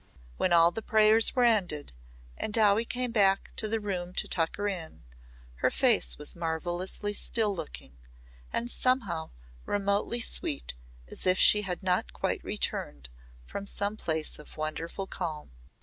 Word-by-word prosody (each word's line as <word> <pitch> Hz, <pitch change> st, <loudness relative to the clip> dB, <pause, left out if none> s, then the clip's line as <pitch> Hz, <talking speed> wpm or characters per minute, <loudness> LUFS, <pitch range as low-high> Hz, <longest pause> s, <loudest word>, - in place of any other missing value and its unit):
When 185 Hz, -, +1 dB
all 170 Hz, 0 st, +6 dB
the 225 Hz, -, -5 dB
prayers 220 Hz, +2 st, +5 dB
were 250 Hz, -, +3 dB
ended 180 Hz, -, +1 dB, 0.4 s
and -, -, -4 dB
Dowie 215 Hz, +1 st, +4 dB
came 250 Hz, 0 st, -2 dB
back 195 Hz, -3 st, +3 dB
to 215 Hz, -, 0 dB
the 225 Hz, +1 st, -1 dB
room 180 Hz, -4 st, -4 dB
to -, -, +1 dB
tuck 165 Hz, -2 st, +1 dB
her 205 Hz, 0 st, -2 dB
in, 170 Hz, -, -6 dB, 0.5 s
her -, -, +2 dB
face -, -, +2 dB
was -, -, -6 dB
marvellously 175 Hz, +5 st, -3 dB
still 210 Hz, -1 st, +1 dB
looking 65 Hz, -, -7 dB, 0.5 s
and 235 Hz, -, -2 dB
somehow 220 Hz, -11 st, 0 dB, 0.3 s
remotely 200 Hz, +3 st, 0 dB
sweet 290 Hz, +5 st, -1 dB, 0.3 s
as -, -, -6 dB
if 185 Hz, 0 st, +4 dB
she 210 Hz, -, +6 dB
had 185 Hz, -2 st, -4 dB
not 180 Hz, -1 st, 0 dB
quite -, -, -2 dB
returned 70 Hz, -4 st, -2 dB, 0.4 s
from 200 Hz, -, -7 dB
some 200 Hz, +1 st, -3 dB
place 160 Hz, -8 st, -2 dB
of 150 Hz, -, -14 dB
wonderful 160 Hz, +5 st, -4 dB
calm. 160 Hz, -, -5 dB
195 Hz, 150 wpm, -29 LUFS, 165-215 Hz, 0.5 s, all